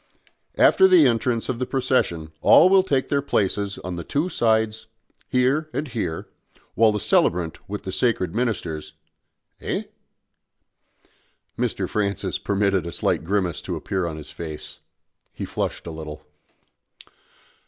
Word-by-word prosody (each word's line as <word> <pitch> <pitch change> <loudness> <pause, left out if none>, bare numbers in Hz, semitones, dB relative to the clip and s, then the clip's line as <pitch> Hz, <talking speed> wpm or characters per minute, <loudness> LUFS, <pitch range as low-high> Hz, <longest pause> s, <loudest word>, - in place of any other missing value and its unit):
"After 380 - +6
the 365 -4 +6
entrance 115 0 +1
of 125 -2 -2
the 125 - -2
procession 125 -12 0
all 180 - +7
will 190 0 +6
take 140 -8 0
their 140 -1 +2
places 100 -6 -1
on 90 -1 -6
these 85 - -7
two 155 +6 0
sides 110 -4 +1 0.4
here 135 +5 +1
and 150 - -2
here 110 -9 -3 0.5
while 110 -1 +4
the 105 - -2
celebrant 85 -3 +1
with 105 +1 -5
the 95 - -5
sacred 95 -4 0
ministers 85 -11 -2 0.3
" - - -42
"Eh?" - - -2 1.7
Mr. - - -1
Francis 100 -3 -1
permitted 100 -3 0
a - - -4
slight - - 0
grimace 95 -1 -1
to - - -4
appear 95 -3 -2
on 80 -2 -5
his 75 - -10
face; 80 -3 -8 0.5
he - - -5
flushed - - -3
a 85 - -5
little. 80 -2 -8
105 Hz, 145 wpm, -23 LUFS, 85-125 Hz, 1.7 s, all